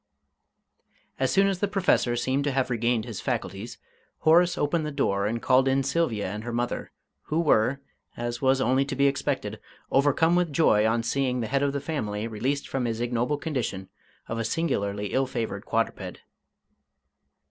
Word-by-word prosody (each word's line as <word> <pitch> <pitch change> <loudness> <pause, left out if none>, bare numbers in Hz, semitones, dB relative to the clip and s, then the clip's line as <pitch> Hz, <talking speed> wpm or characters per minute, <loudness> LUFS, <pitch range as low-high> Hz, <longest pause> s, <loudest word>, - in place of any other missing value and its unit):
As - - +2
soon 195 +1 +4
as 195 -2 0
the 205 - +1
Professor 185 -11 +2
seemed 130 +3 0
to 145 - +1
have 130 -1 0
regained 120 -1 +1
his 115 -6 -6
faculties, 100 +5 -4 0.4
Horace 170 +3 +4
opened 155 +2 0
the 150 - -2
door 100 -8 0
and 115 +2 -1
called 130 +3 +3
in 135 +1 +2
Sylvia 135 -7 0
and 105 +1 -5
her 120 - -4
mother, 120 +1 -2 0.3
who 155 - -1
were, 140 -4 +2 0.4
as 120 0 -3
was 135 0 +3
only 130 +1 +3
to 140 - -4
be 140 +1 +3
expected, 140 0 -1 0.3
overcome 145 +5 +3
with 175 -3 +1
joy 110 -8 +4
on 115 +1 +1
seeing 125 +1 0
the 115 - -2
head 140 - +3
of 140 -1 +2
the 140 - -2
family 110 -9 -3
released 130 +6 -2
from 135 -2 -2
his 115 -1 -2
ignoble 120 +4 0
condition 125 -11 -3 0.4
of 115 - -3
a - - 0
singularly 105 - -1
ill 135 0 +2
favoured 115 -3 -4
quadruped. - - -2
130 Hz, 175 wpm, -26 LUFS, 115-145 Hz, 0.4 s, soon